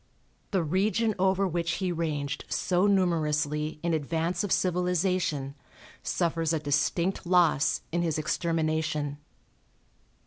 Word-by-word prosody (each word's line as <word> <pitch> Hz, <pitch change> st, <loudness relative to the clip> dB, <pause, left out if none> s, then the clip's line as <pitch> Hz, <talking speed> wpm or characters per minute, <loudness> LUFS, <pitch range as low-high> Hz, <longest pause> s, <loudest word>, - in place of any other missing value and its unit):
The 190 Hz, -4 st, +1 dB
region 210 Hz, +7 st, +1 dB
over 190 Hz, +1 st, +2 dB
which 170 Hz, -1 st, -1 dB
he 185 Hz, 0 st, -1 dB
ranged 150 Hz, -4 st, -2 dB
so 185 Hz, +2 st, +1 dB
numerously 155 Hz, -5 st, +1 dB
in 170 Hz, -1 st, +1 dB
advance 165 Hz, +4 st, -1 dB
of 205 Hz, -, -3 dB
civilization, 180 Hz, -5 st, 0 dB, 0.5 s
suffers 165 Hz, -2 st, 0 dB
a 160 Hz, -, +1 dB
distinct 170 Hz, +5 st, 0 dB
loss 175 Hz, -5 st, +3 dB
in 170 Hz, +1 st, 0 dB
his 165 Hz, -3 st, 0 dB
extermination. 155 Hz, -2 st, -1 dB
170 Hz, 110 wpm, -28 LUFS, 155-180 Hz, 0.5 s, loss